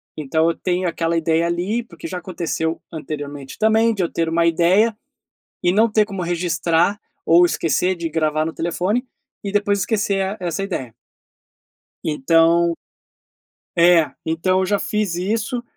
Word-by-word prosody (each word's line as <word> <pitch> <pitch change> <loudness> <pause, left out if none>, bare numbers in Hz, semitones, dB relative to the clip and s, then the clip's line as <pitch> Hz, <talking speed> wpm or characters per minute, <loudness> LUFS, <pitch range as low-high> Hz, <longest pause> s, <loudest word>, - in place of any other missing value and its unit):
então 155 +2 0
eu 165 - -1
tenho 180 0 -1
aquela 165 0 -1
ideia 165 +1 +1
ali, 185 +8 -1
porque 170 -7 -10
já 180 +2 -5
aconteceu 165 -2 -3
anteriormente 145 -3 -7
também 220 +1 +3
de 195 - -1
eu 170 - -2
ter 165 -1 -1
uma 165 +1 +2
ideia 180 +7 +3 0.7
e 175 - +4
não 220 +5 +3
ter 215 -1 +3
como 195 -3 -5
registrar 175 +2 +1 0.3
ou 170 +2 +6
esquecer 175 +2 0
de 170 -1 -4
gravar 155 -1 0
no 165 - -4
telefone 185 +10 -1 0.4
e 200 - -3
depois 205 0 +1
esquecer 200 -1 0
a 195 +3 -3
e - - -4
essa 175 +3 -2
ideia. 150 -11 -4 1.1
Então 165 +3 +3 1.0
É, 170 -2 +5
então 185 +4 +1
eu - - +1
já 200 +1 0
fiz 210 -4 -1
isso, 220 +6 -2
175 Hz, 155 wpm, -20 LUFS, 165-200 Hz, 1.1 s, ou